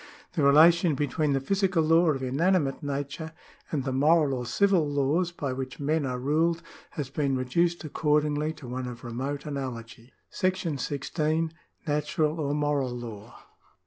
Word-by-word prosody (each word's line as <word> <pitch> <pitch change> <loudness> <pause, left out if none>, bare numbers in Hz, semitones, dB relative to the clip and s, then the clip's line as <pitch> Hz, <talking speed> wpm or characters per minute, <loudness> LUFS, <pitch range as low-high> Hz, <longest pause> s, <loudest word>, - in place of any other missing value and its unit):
The 170 - 0
relation 160 +3 +6
between 145 +1 0
the 135 - +2
physical 190 +3 +1
law 165 +2 +4
of 135 -3 -1
inanimate 145 +2 +1
nature 145 +2 -4 0.4
and 145 -4 -1
the 130 - -2
moral 150 +1 +4
or 125 -2 -3
civil 180 - +2
laws 145 +5 +1
by 140 -6 -3
which 130 0 -6
men 145 0 0
are 125 -1 -2
ruled 160 +6 +1 0.3
has 140 -3 -3
been 140 -2 0
reduced 170 +8 0
accordingly 150 0 +1
to 150 -5 -11
one 125 +1 -4
of 120 0 -8
remote 130 +4 -4
analogy. 125 -4 -6 0.2
§ 185 -6 -1
16. 155 +4 -1 0.3
Natural 150 +1 0
or 145 -1 -1
Moral 145 -3 0
Law. 115 -1 -9
145 Hz, 150 wpm, -27 LUFS, 135-160 Hz, 0.4 s, relation